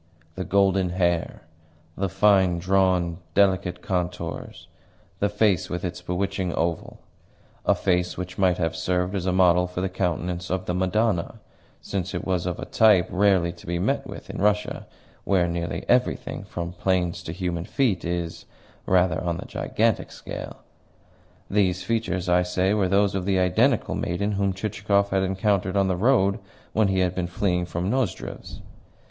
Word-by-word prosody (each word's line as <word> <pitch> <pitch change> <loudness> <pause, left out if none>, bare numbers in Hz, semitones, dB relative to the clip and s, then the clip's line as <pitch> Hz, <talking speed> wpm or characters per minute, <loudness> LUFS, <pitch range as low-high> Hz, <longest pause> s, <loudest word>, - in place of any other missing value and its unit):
The 95 - -4
golden 95 -1 +2
hair, 85 -2 -1 0.5
the 95 0 -1
fine 95 -2 +4
drawn, 90 -1 +1 0.2
delicate 90 -2 +2
contours, 90 -3 -4 0.5
the 100 - +2
face 105 -4 +1
with 90 +1 -3
its 90 0 -5
bewitching 95 +1 -2
oval 85 -1 -2 0.7
a - - +5
face 90 -1 0
which 90 +1 -6
might 90 -2 +3
have 80 -2 -1
served 90 +2 -1
as 95 -2 -2
a - - +2
model 90 -1 +4
for 90 0 -5
the 95 +1 -1
countenance 90 -1 -2
of 95 0 -2
the 90 - -2
Madonna, 95 +1 0 0.5
since 95 -1 -3
it - - -3
was 90 -2 -1
of 90 - -2
a - - -6
type 105 -5 +4
rarely 95 -3 +3
to 85 - -15
be 85 0 -1
met 85 - 0
with - - -8
in - - -5
Russia, 105 +1 0 0.4
where 90 -3 +2
nearly 85 0 -3
everything, 125 0 0
from 85 0 -5
plains 90 -1 0
to 85 - -6
human 90 -1 -3
feet, 115 -10 0
is, 85 -1 -3 0.4
rather, 90 -3 +2
on 85 -1 -1
the - - -7
gigantic - - -1
scale; - - -8 0.9
these 95 -3 +1
features, 95 -6 -1
I 90 0 +4
say, 90 +2 +1
were 100 -3 +1
those 100 +1 +3
of 95 -2 -2
the 95 -1 +2
identical 90 -2 +2
maiden 100 +4 -1
whom 100 -1 0
Chichikov 100 0 0
had 95 0 +2
encountered 95 0 0
on 100 -1 +3
the 95 - +1
road 100 -1 +3 0.3
when 110 -2 +3
he 95 -1 +1
had 90 -1 +1
been 90 -1 -2
fleeing 90 -1 -1
from 90 +3 -2
Nozdrev's. 130 0 -3
90 Hz, 165 wpm, -25 LUFS, 90-100 Hz, 0.9 s, a